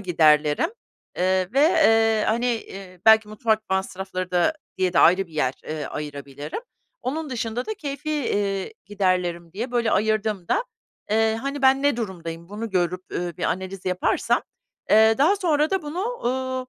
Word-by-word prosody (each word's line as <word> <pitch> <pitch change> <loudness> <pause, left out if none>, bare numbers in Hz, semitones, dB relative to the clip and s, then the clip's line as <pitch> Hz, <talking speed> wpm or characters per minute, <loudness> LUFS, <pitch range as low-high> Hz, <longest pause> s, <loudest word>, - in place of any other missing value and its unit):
giderlerim, 155 - +3 0.5
eee, 185 0 +1
ve, 275 - +3
eee, 225 -9 +4
hani, 235 +3 +1
iii, 190 -4 -11
belki 220 -1 +7
mutfak 220 0 -1
masrafları 190 -1 -3
da 180 - +2 0.2
diye 185 -1 +1
de - - +2
ayrı 185 +2 +5
bir 165 - -20
yer, 130 -4 0
eee, 155 -1 -4
ayırabilirim. 145 - -6 0.4
Onun 295 +3 -3
dışında 235 0 -3
da 435 - -3
keyfî, 290 -1 -5
iii, 205 - -1
giderlerim 180 -4 -1
diye 230 +6 -4
böyle 235 -2 +1
ayırdığımda, 215 - 0 0.5
eee, 220 0 +2
hani 275 +1 -4
ben 265 +1 +5
ne 285 -4 +2
durumdayım 170 -6 -6
bunu 215 +2 -5
görüp, 180 0 0
uuu, 175 -2 -3
bir - - -8
analiz 190 +1 -3
yaparsam, 180 0 +1 0.5
eee, 220 +1 +6
daha 335 +9 +4
sonra 315 -4 +1
da 385 -3 0
bunu, 300 +5 -4
uuu, 260 - -2
215 Hz, 155 wpm, -24 LUFS, 180-260 Hz, 0.5 s, belki